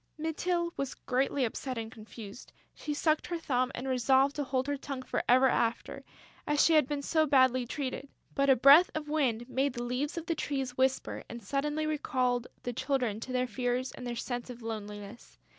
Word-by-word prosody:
Mytyl 340 +2 -1
was 275 -1 -3
greatly 265 +1 0
upset 255 +2 -4
and 225 -1 -5
confused. 220 -1 -11 0.2
She 300 - -6
sucked 310 +1 +1
her 345 - -2
thumb 255 -5 0
and 255 +2 -5
resolved 265 +2 +3
to 290 - 0
hold 260 -1 -1
her 285 0 -1
tongue 275 -1 -6
for - - -1
ever 255 +2 +6
after, 235 -2 -1 0.4
as 295 -1 +3
she 330 - +4
had 305 -4 +5
been 285 -1 -3
so 315 +1 +2
badly 260 -3 +4
treated! 275 0 -4 0.2
But 275 0 +2
a 265 - +7
breath 280 +8 +8
of 305 -1 -4
wind 245 -7 0
made 265 +1 0
the 240 -1 -4
leaves 255 +7 -2
of 335 - -4
the 335 - 0
trees 270 -5 -3
whisper 260 0 0
and 235 -1 -8
suddenly 295 +6 -1
recalled 255 -5 0 0.2
the 245 - -3
Children 245 -4 -1
to 255 - -7
their 255 0 +1
fears 250 +2 -2
and 250 - -8
their 240 - -3
sense 245 +1 -4
of 240 -1 -9
loneliness. 210 0 -7
260 Hz, 195 wpm, -30 LUFS, 245-290 Hz, 0.4 s, breath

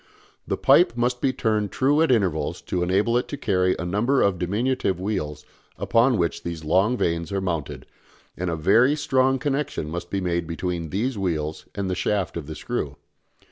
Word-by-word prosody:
The - - -1
pipe 115 - +4
must 125 +1 0
be 135 - +2
turned 110 -5 0
true 145 +4 +2
at 160 - +3
intervals 90 - +1
to 90 - -2
enable 100 +7 +2
it - - -5
to 145 - -5
carry 95 -6 +1
a 90 - -4
number 110 +10 +2
of 95 -3 +1
diminutive 100 +1 0
wheels 75 -7 -3 0.3
upon 120 +1 +3
which 85 -2 -1
these 85 -2 -5
long 95 +10 +2
vanes 85 -1 -1
are 100 - 0
mounted, 85 -6 -3 0.5
and 90 +1 -3
a 85 - -1
very 115 - +4
strong 135 -3 +2
connection 140 - -2
must 85 +1 -5
be 100 - -1
made 85 -2 -1
between 85 0 -3
these 110 - -2
wheels 80 -5 -2
and 100 -1 -2
the 95 - -1
shaft 95 0 -1
of 80 -4 -5
the 80 - -6
screw. - - -4
95 Hz, 185 wpm, -24 LUFS, 85-120 Hz, 0.5 s, pipe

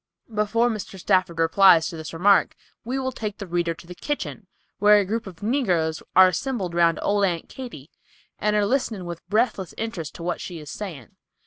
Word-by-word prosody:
Before 215 +3 +2
Mr. 215 -4 -4
Stafford 185 -2 +1
replies 165 0 +5
to - - -8
this 160 -1 -7
remark 195 +5 +3 0.3
we 250 +3 -3
will 260 -1 -2
take 215 -4 -5
the 200 - -6
reader 170 -1 -1
to - - -14
the 180 - -9
kitchen, 295 +11 -5 0.3
where 210 0 +7
a 205 - +2
group 220 +2 -3
of 180 0 -11
negroes 180 - 0
are 185 0 +9
assembled 190 -1 -3
round 170 -2 +3
old 205 0 +2
Aunt 175 -4 0
Katy, 215 - -9 0.5
and 210 0 +1
are 210 -1 +3
listening 220 -5 -1
with 170 -1 -6
breathless 210 -4 0
interest 215 -9 -5
to 170 - -8
what 175 0 -2
she 175 - -6
is 150 -2 -9
saying. 165 - -8
190 Hz, 195 wpm, -24 LUFS, 170-215 Hz, 0.5 s, are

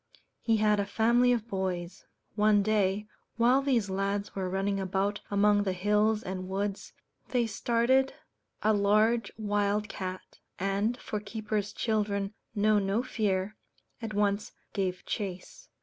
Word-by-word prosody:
He 225 -1 +2
had 210 -1 +3
a 200 - +1
family 240 +2 +3
of 235 -2 0
boys. 185 -3 -4 0.3
One 210 -1 +4
day, 210 -1 +1 0.3
while 245 +3 +4
these 250 -7 +1
lads 195 +1 -2
were 190 -2 -2
running 195 +1 0
about 195 +2 -1
among 205 0 +4
the 195 -2 0
hills 210 +3 +2
and 185 0 -5
woods, 200 +1 -3 0.4
they 245 -3 +2
started 235 +5 +2 0.5
a 215 +1 +4
large 215 +3 +3
wild 205 0 0
cat, 185 -1 -6 0.2
and 200 +5 0
for 210 - -4
keepers' 210 0 -3
children 205 -2 -1 0.2
know 210 0 +4
no 200 +4 0
fear 210 -4 -1 0.4
at 220 -2 -5
once 205 0 0 0.2
gave 185 -3 -2
chase. 190 -4 -5
205 Hz, 135 wpm, -29 LUFS, 195-220 Hz, 0.5 s, One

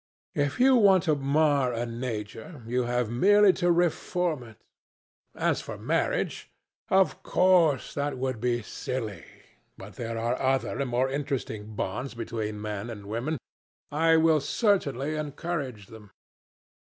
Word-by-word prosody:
If 145 - -1
you 260 +1 +6
want 195 -5 +5
to 155 - +2
mar 140 -2 +2
a 120 +1 -2
nature, 115 - -6
you 125 +2 0
have 120 -2 -1
merely 205 +9 +5
to 175 -2 +1
reform 175 -2 0
it. 115 -3 -13 0.8
As - - 0
for - - -7
marriage, - - -1 0.4
of 190 0 +3
course 175 -7 +3
that 145 -1 -2
would 130 -3 -3
be 120 -1 0
silly, 110 - -5 0.5
but - - -11
there 115 -1 -4
are 120 +2 -1
other 135 +1 0
and 140 -2 -1
more 125 +2 +1
interesting 130 -6 -4
bonds 120 +7 -3
between 110 -2 -4
men 105 +1 -4
and 105 -3 -8
women. 120 +10 -2 0.5
I 160 +2 +4
will 160 -1 +4
certainly 150 - 0
encourage 145 - -4
them. 105 0 -14
130 Hz, 140 wpm, -27 LUFS, 115-160 Hz, 0.8 s, you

